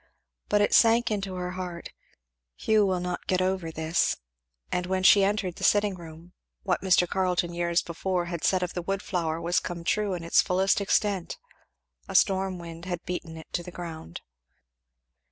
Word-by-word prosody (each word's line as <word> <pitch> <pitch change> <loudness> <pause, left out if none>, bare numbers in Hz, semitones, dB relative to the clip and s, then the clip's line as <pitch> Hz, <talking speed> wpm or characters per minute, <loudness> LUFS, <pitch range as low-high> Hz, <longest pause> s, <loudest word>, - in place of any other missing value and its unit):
But 205 0 +3
it 205 - +2
sank 230 0 +5
into 195 -3 -2
her 180 0 -3
heart, 180 -2 -6 0.7
"Hugh 215 -2 +2
will 185 -1 0
not 180 0 -4
get 185 - +2
over 185 -2 -1
this!" 160 +1 0 0.5
and 180 0 -1
when 185 0 -1
she 195 +1 +7
entered 195 -3 0
the - - -8
sitting 205 -1 +3
room, 170 0 -12 0.3
what 185 -3 0
Mr. 180 -2 +3
Carleton 180 -2 0
years 170 0 0
before 175 +1 -2
had 170 -2 -5
said 185 -1 +2
of 180 - -3
the 175 - -3
wood 195 +3 -3
flower 165 -4 -2
was 170 +1 +1
come 170 -1 -6
true 205 +1 0
in 170 - -6
its 170 - +4
fullest 190 +2 +1
extent 200 -2 0 0.7
"a - - -7
storm 190 -2 +3
wind 170 0 -9
had 175 -2 -4
beaten 170 -2 -5
it 160 - -13
to 175 - -1
the 175 - -9
ground." 165 - -8
180 Hz, 180 wpm, -27 LUFS, 170-190 Hz, 0.7 s, she